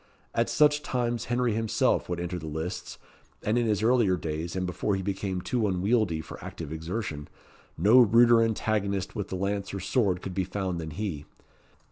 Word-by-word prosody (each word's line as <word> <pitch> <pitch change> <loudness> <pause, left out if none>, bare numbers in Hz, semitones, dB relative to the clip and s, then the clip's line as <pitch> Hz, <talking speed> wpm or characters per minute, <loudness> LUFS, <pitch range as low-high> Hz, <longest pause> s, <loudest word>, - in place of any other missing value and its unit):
At - - +1
such 150 0 +4
times 120 -4 -1
Henry 120 -1 +1
himself 110 -4 +1
would 90 -1 -2
enter 90 +1 -3
the 80 - -7
lists; 80 +4 -5 0.5
and, 105 - +1
in 120 -1 +2
his 105 -1 +1
earlier 115 -6 +3
days, 80 +2 -4
and 95 0 -1
before 95 +3 -1
he 95 - -3
became 95 -1 -2
too 115 +1 0
unwieldy 95 -2 +1
for - - -10
active 80 -2 -7
exertion, 80 -2 -4 0.5
no 105 +9 +6
ruder 120 0 +6
antagonist 105 -3 -1
with 100 -3 -3
the - - -4
lance 100 +1 -2
or - - -3
sword 95 -2 0
could 95 - -5
be 95 +1 0
found 95 -2 -3
than 80 - -5
he. 80 -3 -4
100 Hz, 180 wpm, -28 LUFS, 90-115 Hz, 0.5 s, no